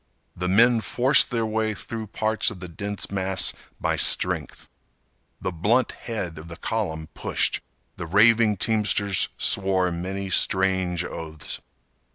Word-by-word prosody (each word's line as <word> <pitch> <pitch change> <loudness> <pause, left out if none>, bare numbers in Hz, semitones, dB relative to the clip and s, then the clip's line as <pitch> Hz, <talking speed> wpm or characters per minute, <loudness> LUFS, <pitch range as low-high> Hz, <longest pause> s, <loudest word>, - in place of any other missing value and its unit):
The 90 +1 -3
men 115 +5 +4
forced 130 +5 +3
their 115 -3 -1
way 110 0 -1
through 110 +2 -7
parts 110 +2 0
of 105 - -8
the 90 - -7
dense 100 +5 -4
mass 95 -1 0 0.3
by - - 0
strength. - - +2 0.7
The 95 - -3
blunt 105 +10 +1
head 90 -9 -6
of 80 - -11
the 85 - -9
column 80 -8 -3
pushed. - - -1 0.4
The 85 - -6
raving 110 +3 +4
teamsters 100 -2 +2
swore 95 -2 +1
many 95 +3 -4
strange 95 -2 +2
oaths. 80 -3 -7
100 Hz, 135 wpm, -24 LUFS, 90-110 Hz, 0.7 s, men